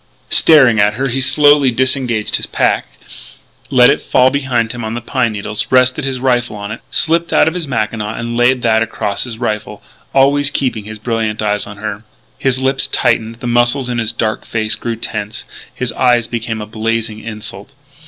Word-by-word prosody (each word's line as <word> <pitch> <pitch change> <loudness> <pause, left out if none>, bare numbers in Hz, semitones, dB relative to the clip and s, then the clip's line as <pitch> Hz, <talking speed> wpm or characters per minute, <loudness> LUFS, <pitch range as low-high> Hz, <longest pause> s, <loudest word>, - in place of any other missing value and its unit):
Staring 130 -8 +6
at 105 +1 +3
her 135 +2 -1
he 135 +2 0
slowly 145 +1 +5
disengaged 125 -3 0
his - - -5
pack, - - 0 0.8
let - - +6
it - - -1
fall 130 +1 +3
behind 125 -5 -1
him 120 -1 -6
on 110 +1 -4
the - - -3
pine 120 -1 -1
needles; 105 +1 -3
rested 130 +2 +3
his 130 -2 -2
rifle 120 -3 0
on 100 0 -6
it; - - -7
slipped 165 +1 +1
out - - +4
of 160 - 0
his 175 -4 -4
mackinaw 110 -3 -2
and 115 0 -4
laid 125 +1 +2
that 110 -1 +3
across 115 -1 -2
his 120 -3 -7
rifle 105 -3 -4 0.3
always 140 +1 +3
keeping 125 -7 -2
his 110 0 -8
brilliant 110 -1 -2
eyes 105 -1 0
on 100 0 -10
her. 105 0 -5 0.4
His 135 -2 +1
lips 135 +1 0
tightened, 115 -1 0
the - - -6
muscles 120 +2 +1
in 120 -1 -2
his 115 -1 0
dark 110 -2 -2
face 110 -1 -2
grew 115 -1 -3
tense; 110 -1 -5 0.3
his 125 -2 -4
eyes 120 -2 +2
became 115 -1 -4
a - - -5
blazing 110 0 -3
insult. 110 0 -7
120 Hz, 190 wpm, -15 LUFS, 110-130 Hz, 0.8 s, Staring